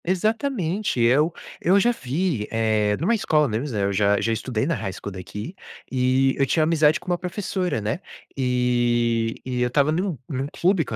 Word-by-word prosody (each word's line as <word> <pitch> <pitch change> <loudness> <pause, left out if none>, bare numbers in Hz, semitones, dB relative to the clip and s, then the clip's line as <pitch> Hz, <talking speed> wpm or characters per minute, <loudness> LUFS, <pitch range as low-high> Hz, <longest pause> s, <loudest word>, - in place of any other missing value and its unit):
Exatamente, 210 - -1
eu 135 +8 +4 0.3
eu 190 +4 +4
já 240 +4 +3
vi, 145 - -2
eh, 110 -2 +1
em - - -4
uma 220 +7 +3
escola 155 -9 +2
deles, 120 +5 -2
né, 105 -3 -1
eu 100 0 0
já 100 +1 +3
já 115 +2 0
estudei 115 0 -2
na 165 - 0
High 100 - -3
School 100 - -7
daqui, 105 - -7 0.4
e 130 +1 +2
eu 135 - +4
tinha 155 +4 +2
amizade 155 -1 +3
com - - -18
uma 175 -1 0
professora, 180 - -2
né, 105 +9 -2 0.4
e 120 -3 +1
e 125 -1 -2
eu 125 - +3
estava 140 +4 +2
num 175 0 -1
num 135 -1 -3
clube 180 -1 +2
com 110 - -5
135 Hz, 190 wpm, -23 LUFS, 115-175 Hz, 0.4 s, eu